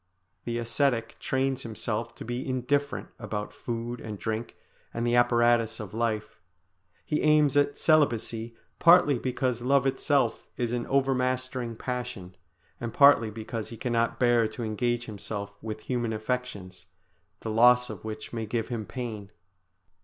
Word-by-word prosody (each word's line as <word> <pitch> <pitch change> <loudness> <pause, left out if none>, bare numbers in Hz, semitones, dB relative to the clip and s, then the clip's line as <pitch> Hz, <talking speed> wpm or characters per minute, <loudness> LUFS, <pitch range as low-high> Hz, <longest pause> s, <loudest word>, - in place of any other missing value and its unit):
The 120 0 -2
ascetic 115 0 0
trains 135 0 0
himself 115 0 -3
to - - -9
be 120 +3 -4
indifferent 140 +3 -1
about 105 -2 -4
food 120 0 -5
and 105 -2 -6
drink 110 +3 -4 0.4
and 115 +1 -2
the 120 - +1
apparatus 120 -2 +3
of 105 -2 -7
life; 110 -3 -2 0.7
he 150 - 0
aims 150 -2 +4
at 145 0 +2
celibacy 120 -7 +2 0.2
partly 165 -6 +6
because 125 -1 -1
love 135 +2 +3
itself 135 -2 +1
is 120 -1 -1
an 120 -1 -2
overmastering 130 -2 0
passion, 110 -7 -5 0.4
and 120 -1 -4
partly 140 -6 +6
because 110 +1 -5
he 115 - -9
cannot 115 -1 0
bear 120 -2 +4
to 110 +2 -6
engage 120 +2 -1
himself 100 -2 -6
with 110 -1 -5
human 120 -2 -2
affections, 110 -6 -4 0.5
the 110 - -4
loss 125 +2 +5
of - - -9
which 110 +1 -7
may 115 -2 -3
give 115 0 -2
him 115 -4 -4
pain. 110 -5 -5
120 Hz, 145 wpm, -28 LUFS, 110-130 Hz, 0.7 s, partly